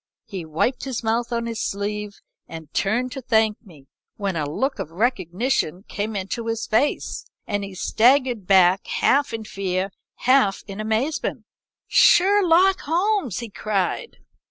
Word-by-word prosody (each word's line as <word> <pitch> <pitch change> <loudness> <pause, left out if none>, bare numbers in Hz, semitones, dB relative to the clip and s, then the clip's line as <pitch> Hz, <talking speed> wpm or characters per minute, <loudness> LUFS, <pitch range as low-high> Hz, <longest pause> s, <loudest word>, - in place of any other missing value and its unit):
He 185 -5 -6
wiped 160 - -1
his 255 -3 -4
mouth 230 +2 0
on 235 0 -1
his 230 -1 -4
sleeve 205 +1 -4 0.3
and 160 -2 -10
turned 240 +6 0
to 270 - -6
thank 220 -3 +1
me, 160 - -17 0.3
when 200 -3 -2
a 150 -3 -2
look 265 - -2
of 190 - -4
recognition 190 - -1
came 210 +1 -4
into 200 +4 -4
his 225 0 -2
face, 250 +7 0 0.2
and 205 -1 -2
he 195 -1 -7
staggered 240 0 +2
back 190 -1 +4
half 280 -1 +2
in 225 -1 -4
fear 190 -3 -2
and 195 - -7 0.2
half 255 -6 +2
in 195 0 -8
amazement. 220 +8 -2 0.4
"'Sherlock 375 0 +5
Holmes!' 350 - 0
he 235 - -6
cried. 210 - -2
220 Hz, 150 wpm, -23 LUFS, 195-255 Hz, 0.4 s, Sherlock